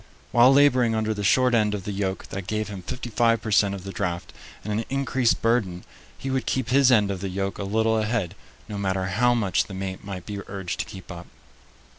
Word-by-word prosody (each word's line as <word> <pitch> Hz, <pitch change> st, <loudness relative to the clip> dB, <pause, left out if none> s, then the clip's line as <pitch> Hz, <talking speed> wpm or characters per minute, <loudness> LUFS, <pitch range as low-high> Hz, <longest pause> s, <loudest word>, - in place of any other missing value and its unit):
While 120 Hz, +2 st, +6 dB
laboring 130 Hz, -5 st, +4 dB
under 110 Hz, 0 st, 0 dB
the 105 Hz, -1 st, -5 dB
short 125 Hz, +5 st, +3 dB
end 105 Hz, -2 st, +2 dB
of 100 Hz, -, -6 dB
the 105 Hz, -, -4 dB
yoke 95 Hz, -1 st, -3 dB
that 95 Hz, -2 st, -6 dB
gave 110 Hz, 0 st, -2 dB
him 100 Hz, -2 st, -7 dB
fifty 120 Hz, +5 st, -6 dB
five 115 Hz, +1 st, +3 dB
per 110 Hz, 0 st, -5 dB
cent 100 Hz, -1 st, +3 dB
of 95 Hz, -, -8 dB
the 95 Hz, -, -6 dB
draft 90 Hz, -3 st, -3 dB, 0.3 s
and 105 Hz, -, -3 dB
an 110 Hz, +2 st, -1 dB
increased 135 Hz, -3 st, +1 dB
burden, 105 Hz, -7 st, +1 dB, 0.3 s
he 135 Hz, -, -4 dB
would 130 Hz, -1 st, -1 dB
keep 130 Hz, -2 st, -1 dB
his 135 Hz, 0 st, +5 dB
end 105 Hz, -4 st, +4 dB
of 95 Hz, -2 st, -5 dB
the 100 Hz, -, -3 dB
yoke 95 Hz, +1 st, -3 dB
a -, -, -2 dB
little 110 Hz, +2 st, +1 dB
ahead, 105 Hz, -5 st, -1 dB, 0.3 s
no 105 Hz, -2 st, -5 dB
matter 95 Hz, -1 st, -1 dB
how 120 Hz, +6 st, +2 dB
much 100 Hz, -6 st, +1 dB
the 100 Hz, -, -9 dB
mate 95 Hz, 0 st, -5 dB
might 95 Hz, -3 st, -7 dB
be 100 Hz, -1 st, -5 dB
urged 95 Hz, -3 st, -5 dB
to -, -, -1 dB
keep 95 Hz, -1 st, -10 dB
up. 85 Hz, 0 st, -9 dB
105 Hz, 230 wpm, -25 LUFS, 95-120 Hz, 0.3 s, While